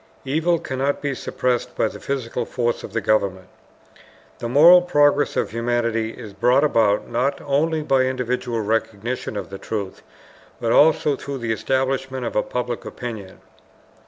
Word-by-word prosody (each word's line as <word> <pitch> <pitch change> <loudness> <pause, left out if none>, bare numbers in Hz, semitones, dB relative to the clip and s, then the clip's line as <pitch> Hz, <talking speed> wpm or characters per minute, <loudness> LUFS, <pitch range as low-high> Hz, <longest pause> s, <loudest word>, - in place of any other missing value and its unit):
EVIL 160 +5 +1
CANNOT 135 -1 -2
BE 145 -1 -2
SUPPRESSED 125 -1 -2
BY - - +1
THE - - -10
PHYSICAL 125 -3 -3
FORCE 120 -1 -1
OF - - -9
THE 115 - 0
GOVERNMENT 95 -3 0 0.9
THE 115 - -4
MORAL 165 +8 +8
PROGRESS 145 -4 +2
OF - - 0
HUMANITY 115 -1 -1
IS 110 -5 -10
BROUGHT 125 +8 +3
ABOUT 110 -8 +2
NOT 130 +4 -1
ONLY 155 +3 0
BY 135 -3 +2
INDIVIDUAL 125 -2 -2
RECOGNITION 110 +1 -2
OF 95 -1 -7
TRUTH, 100 -4 -5 0.6
BUT 115 -1 -1
ALSO 150 0 +4
THROUGH 140 -1 -6
THE 115 -3 -3
ESTABLISHMENT 130 +1 -1
OF - - -4
A 105 - +3
PUBLIC 125 -1 -4
OPINION. 110 -6 -8
125 Hz, 150 wpm, -22 LUFS, 115-140 Hz, 0.9 s, MORAL